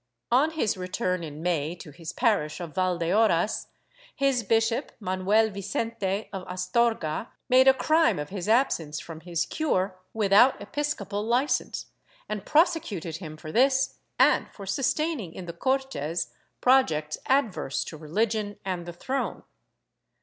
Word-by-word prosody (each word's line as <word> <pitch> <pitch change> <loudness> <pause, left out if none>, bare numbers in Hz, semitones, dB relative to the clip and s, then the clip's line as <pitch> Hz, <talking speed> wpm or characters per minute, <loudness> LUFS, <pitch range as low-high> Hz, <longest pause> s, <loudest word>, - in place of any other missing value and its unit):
On 270 +6 +4
his 310 -12 -1
return 185 -1 -2
in 155 0 -7
May 165 -2 0
to 165 -3 -11
his 165 +3 -7
parish 200 -11 +1
of 170 -4 -6
Valdeorras, 185 +2 +1 0.5
his 275 -3 +2
bishop, 225 +5 +1
Manuel 200 +3 +2
Mcente 200 0 -2
of 190 - -3
Astorga, 185 0 0 0.2
made 260 +1 +6
a 265 - +9
crime 315 +4 +3
of 150 0 -4
his 195 0 -4
absence 170 - +2
from 165 -2 -9
his 170 0 -2
cure 190 -12 -1
without 215 +4 +5
episcopal 205 -4 -3
licence 245 +6 0 0.4
and 210 -2 -5
prosecuted 295 - +1
him 155 -3 -8
for 155 0 -8
this 265 - +2 0.2
and - - +4
for 200 - -10
sustaining 255 - -1
in 185 - -7
the 170 - -6
Cortes 260 - -1 0.3
projects 160 -13 +3
adverse 230 - +1
to - - -8
religion 205 +7 -1
and 180 -2 -3
the 175 - -6
throne. 260 +10 -3
200 Hz, 135 wpm, -27 LUFS, 175-245 Hz, 0.5 s, a